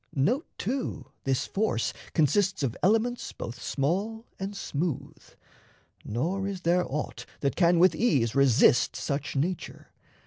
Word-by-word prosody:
Note, 230 - +1
too, 255 +5 -3
this 135 -2 +1
force 195 - 0 0.2
consists 190 +3 +2
of 125 -3 -1
elements 225 +5 +1
Both 120 +1 -7
small 200 - -1
and 195 +1 -4
smooth, 160 -4 -3 0.8
nor 175 - -1
is 195 -2 -4
there 175 -3 +1
aught 150 +2 -4
that 140 - 0
can 175 -1 +4
With 185 +2 +6
ease 135 - +2
resist 130 -2 +4
such 145 +1 -3
nature. 165 +5 -3
175 Hz, 130 wpm, -28 LUFS, 140-200 Hz, 0.8 s, With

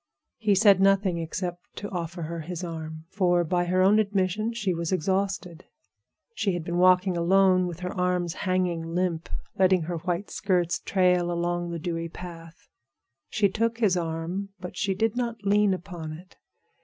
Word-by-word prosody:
He 210 -3 +3
said 195 -1 +6
nothing 195 -3 +3
except 175 +2 -5
to 205 - -5
offer 170 -1 -4
her 165 +2 -4
his 175 +2 -5
arm, 160 -2 -6
for, 175 -3 +2
by 175 +2 0
her 185 +1 +2
own 205 +3 +5
admission, 200 +1 0
she 210 -5 -1
was 170 0 -3
exhausted. 185 -1 -1 0.7
She 200 - 0
had 175 -2 -3
been 170 +1 -2
walking 185 0 +4
alone 185 +1 +4
with 175 0 -7
her 180 0 -3
arms 180 -2 0
hanging 175 -3 -1
limp, 175 -3 -1 0.3
letting 185 -2 +4
her 170 +1 -3
white 175 +3 -3
skirts 180 -4 0
trail 180 -2 +2
along 175 0 -1
the 170 - -3
dewy 165 0 -3
path. 165 -1 -10 0.6
She 210 -1 +3
took 230 +4 -1
his 210 -6 +3
arm, 170 +3 -3
but 180 -1 -7
she 195 -1 0
did 225 +2 0
not 235 -3 -3
lean 205 0 +4
upon 175 -4 -5
it. 180 +4 -13
180 Hz, 165 wpm, -26 LUFS, 170-195 Hz, 0.7 s, said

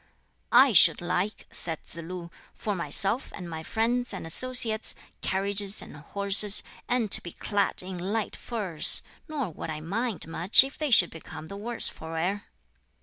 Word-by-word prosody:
"I 265 -2 +7
should 180 - +6
like," 180 +4 -2
said 165 -3 -6
Tsz - - -10
lu, 170 +1 -8 0.2
"for 210 - -3
myself 195 - +2
and 180 -3 -8
my 160 -1 -6
friends 235 +8 -1
and - - -7
associates, 230 +4 +3 0.3
carriages 200 +1 +1
and - - -2
horses, 200 +6 +1 0.3
and 240 -4 0
to - - +4
be 175 - -9
clad 205 -3 0
in 185 -1 -7
light 205 +4 -3
furs! 195 -10 +1 0.2
nor 280 - -4
would 160 - -8
I 155 -1 -4
mind 205 +6 -3
much 175 +8 +5
if 270 +1 -8
they 305 -1 -1
should 185 -8 +6
become 160 -1 -10
the 200 - -7
worse 230 +3 0
for 160 0 -7
wear." 185 +5 -2
200 Hz, 165 wpm, -27 LUFS, 170-225 Hz, 0.3 s, I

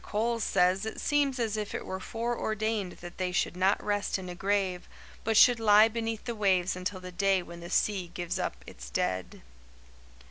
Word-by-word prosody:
Coles 230 +1 -1
says 185 +1 +2
it 220 - -5
seems 285 -3 +1
as 225 -3 -1
if 210 -1 -4
it - - -4
were 190 - -4
foreordained 220 -3 -2
that 175 +1 -10
they 185 -1 -1
should 180 - 0
not 190 +2 +2
rest 205 -1 0
in 185 -1 -7
a - - -5
grave, 190 -1 -1 0.3
but 225 -1 +1
should 245 0 +7
lie 215 0 +7
beneath 225 -1 -3
the 240 - -3
waves 190 -4 +1
until 185 +1 -4
the 185 0 -9
day 190 0 +2
when 170 0 -10
the 170 0 -9
sea 195 -3 +1
gives 175 +1 -3
up 180 - -4
its - - -10
dead." 90 +7 -2
200 Hz, 190 wpm, -29 LUFS, 180-220 Hz, 0.3 s, should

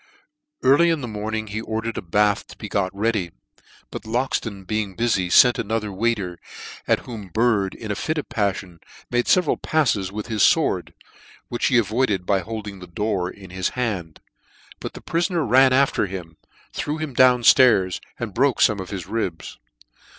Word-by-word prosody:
Early 145 +6 +5
in 165 -3 0
the 125 - -4
morning 110 0 -4
he 110 +1 -5
ordered 110 +1 -3
a - - -3
bath 100 +3 +1
to - - -13
be - - -7
got 95 -2 0
ready; 105 -3 -1 0.6
but - - -6
Loxton 115 -4 -2
being 105 -2 -2
bufy, 110 -6 +1
fent 125 +7 +6
another 110 -1 -2
waiter, 100 -4 -1 0.5
at - - +2
whom 110 -5 -8
Bird, 105 0 +1
in 110 -2 -6
a - - -1
fit 155 +8 -2
of 150 - -3
paffion, 100 -4 -2 0.3
made 120 0 +1
feveral 180 -5 +2
pafles 115 -12 +1
with 105 +1 -5
his 110 -3 -2
fword, - - +2 0.6
which 120 - 0
he 125 - +3
avoided 110 -4 +1
by 100 0 +2
holding 105 -2 -6
the 90 - -10
door 95 0 -2
in 95 -1 -12
his 95 -1 -1
hand: 95 -10 -3 0.6
but - - -6
the - - -10
prifoner 170 0 0
ran 130 +3 +5
after 135 -5 +2
him, 90 -4 -8 0.4
threw 150 +1 -3
him 155 -3 -5
down 125 -1 +5
flairs, 105 -8 +5 0.2
and 115 -4 -4
broke 135 +3 +2
fome 105 -2 +4
of 95 - -6
his 95 -3 -5
ribs. 95 -5 -4
110 Hz, 175 wpm, -22 LUFS, 95-120 Hz, 0.6 s, fent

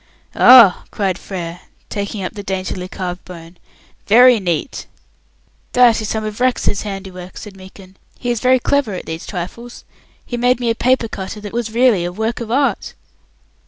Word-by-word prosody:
"Ah!" 240 -7 +7
cried 195 -3 -2
Frere, 175 -3 -6 0.3
taking 200 -1 -4
up 185 - -4
the 210 - -7
daintily 190 -1 -4
carved 180 -1 -6
bone, 170 -1 -12 0.5
"very 245 +2 +6
neat!" 175 - -3 0.9
"That 240 -3 +5
is 215 - -4
some 220 -1 -2
of 215 +1 -6
Rex's 250 -5 0
handiwork," 190 -3 -8
said 210 -2 -10
Meekin. 190 0 -15 0.2
"He 245 - -2
is 240 - -1
very 255 +2 +4
clever 255 -5 0
at - - -7
these 160 +1 -7
trifles. 225 +6 -7 0.4
He 240 - -5
made 245 +1 +2
me 235 -2 0
a - - +1
paper 250 0 +1
cutter 195 0 -7
that 205 0 -8
was 235 -1 -2
really 235 -5 +3
a 175 - -3
work 220 +5 -3
of 235 -2 -6
art." 260 -3 0
210 Hz, 170 wpm, -18 LUFS, 185-240 Hz, 0.9 s, Ah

